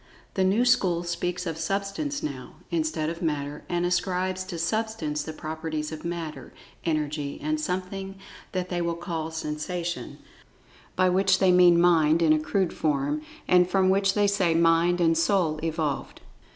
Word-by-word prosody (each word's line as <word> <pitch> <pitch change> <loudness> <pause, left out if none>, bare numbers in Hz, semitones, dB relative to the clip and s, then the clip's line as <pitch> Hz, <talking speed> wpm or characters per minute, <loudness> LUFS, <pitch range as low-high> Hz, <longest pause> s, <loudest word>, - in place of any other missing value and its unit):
The 190 - +1
new 200 +6 +3
school 185 -9 +3
speaks 175 +1 -3
of 165 -2 -4
Substance 200 - -2
now, 130 -4 -6 0.2
instead 155 -1 -1
of 170 - -8
Matter, 150 -3 -2
and 175 0 0
ascribes 185 +1 0
to 185 -3 -6
"Substance" 170 -4 -1
the 160 - -5
properties 155 0 -4
of 155 - -7
Matter, 160 -6 -5 0.3
En[Pg 150 -2 -1
24]ergy, - - -15
and 155 +1 -1
something 190 +3 -4 0.4
that 185 -1 -3
they 175 -1 -1
call 170 -1 -3
Sensation, 165 +2 -4 0.8
by 185 - +3
which 190 +1 +3
they 190 -1 +4
mean 180 -1 +6
Mind 165 -2 +4
in 155 -1 +5
a 155 - +2
crude 180 +3 0
form, 145 -1 0 0.3
and 180 0 +5
from 190 -1 +3
which 195 0 +2
they 205 -1 +3
say 195 -5 +2
Mind 170 +1 +3
and 165 -1 +3
"Soul" 165 -2 +1
evolved. 160 -4 -2
170 Hz, 160 wpm, -26 LUFS, 155-185 Hz, 0.8 s, mean